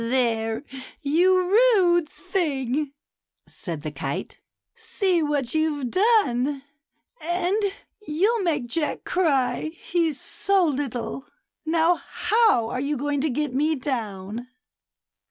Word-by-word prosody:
"There, 230 Hz, -1 st, 0 dB, 0.4 s
you 350 Hz, +6 st, +4 dB
rude 370 Hz, -4 st, +4 dB
thing," 285 Hz, -5 st, -2 dB, 0.5 s
said 165 Hz, -6 st, -6 dB
the 155 Hz, -, -4 dB
kite, 140 Hz, -1 st, -5 dB, 0.2 s
" -, -, -62 dB
see 370 Hz, -5 st, 0 dB
what 290 Hz, -5 st, 0 dB
you've 300 Hz, -5 st, 0 dB
done; 295 Hz, -, +2 dB, 0.6 s
and 355 Hz, +5 st, 0 dB, 0.4 s
you'll 405 Hz, +10 st, +2 dB
make 305 Hz, -8 st, 0 dB
Jack 295 Hz, +6 st, -2 dB
cry, 275 Hz, -9 st, +1 dB
he's 330 Hz, -5 st, 0 dB
so 390 Hz, -2 st, +1 dB
little. 270 Hz, -3 st, -3 dB, 0.4 s
Now, 330 Hz, +2 st, +3 dB
how 435 Hz, -, +2 dB
are 255 Hz, -, -3 dB
you 285 Hz, +1 st, -1 dB
going 285 Hz, +1 st, -1 dB
to 310 Hz, -, +1 dB
get 290 Hz, 0 st, -2 dB
me 305 Hz, +4 st, +2 dB
down?" 230 Hz, -4 st, -4 dB
295 Hz, 115 wpm, -24 LUFS, 250-350 Hz, 0.6 s, you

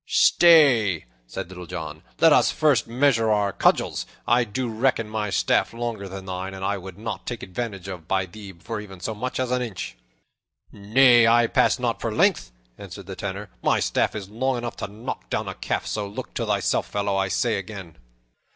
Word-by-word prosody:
"Stay!" 150 Hz, -, +5 dB, 0.2 s
said -, -, -6 dB
Little 90 Hz, -1 st, -10 dB
John. 80 Hz, -3 st, -6 dB, 0.2 s
"Let 165 Hz, -2 st, +7 dB
us -, -, +4 dB
first 145 Hz, -6 st, +2 dB
measure 120 Hz, -2 st, +2 dB
our 105 Hz, -2 st, +1 dB
cudgels. -, -, +1 dB, 0.2 s
I 120 Hz, +1 st, +4 dB
do 125 Hz, +4 st, -3 dB
reckon 115 Hz, 0 st, 0 dB
my 105 Hz, -1 st, -3 dB
staff 95 Hz, -, +1 dB
longer 115 Hz, -4 st, -4 dB
than 95 Hz, 0 st, -8 dB
thine, 95 Hz, +1 st, -5 dB
and 95 Hz, 0 st, -5 dB
I 100 Hz, 0 st, -1 dB
would 95 Hz, 0 st, -10 dB
not 110 Hz, +2 st, -6 dB
take 120 Hz, -2 st, -5 dB
vantage 100 Hz, -1 st, -5 dB
of 90 Hz, -4 st, -8 dB
thee 95 Hz, +1 st, -3 dB
by 85 Hz, +4 st, -16 dB
even 95 Hz, -3 st, -11 dB
so 110 Hz, +5 st, -3 dB
much 125 Hz, +5 st, -4 dB
as 130 Hz, -1 st, -1 dB
an 125 Hz, 0 st, +1 dB
inch." 95 Hz, -, -5 dB, 0.8 s
"Nay, 120 Hz, +3 st, +5 dB
I 120 Hz, +1 st, +5 dB
pass -, -, +2 dB
not -, -, -2 dB
for -, -, -2 dB
length," -, -, +2 dB, 0.3 s
answered 100 Hz, 0 st, -9 dB
the 95 Hz, 0 st, -7 dB
Tanner. 100 Hz, 0 st, -5 dB
"My -, -, +2 dB
staff -, -, 0 dB
is 100 Hz, -3 st, -5 dB
long 125 Hz, +5 st, -1 dB
enough 120 Hz, -1 st, -5 dB
to -, -, -4 dB
knock 105 Hz, -, -7 dB
down -, -, -2 dB
a -, -, -4 dB
calf; -, -, -3 dB
so 105 Hz, -2 st, -3 dB
look 100 Hz, -, -8 dB
to -, -, -3 dB
thyself, -, -, 0 dB
fellow, 100 Hz, -1 st, -1 dB
I 95 Hz, 0 st, +1 dB
say 110 Hz, +1 st, 0 dB
again." 95 Hz, -4 st, -9 dB
105 Hz, 195 wpm, -24 LUFS, 95-120 Hz, 0.8 s, Let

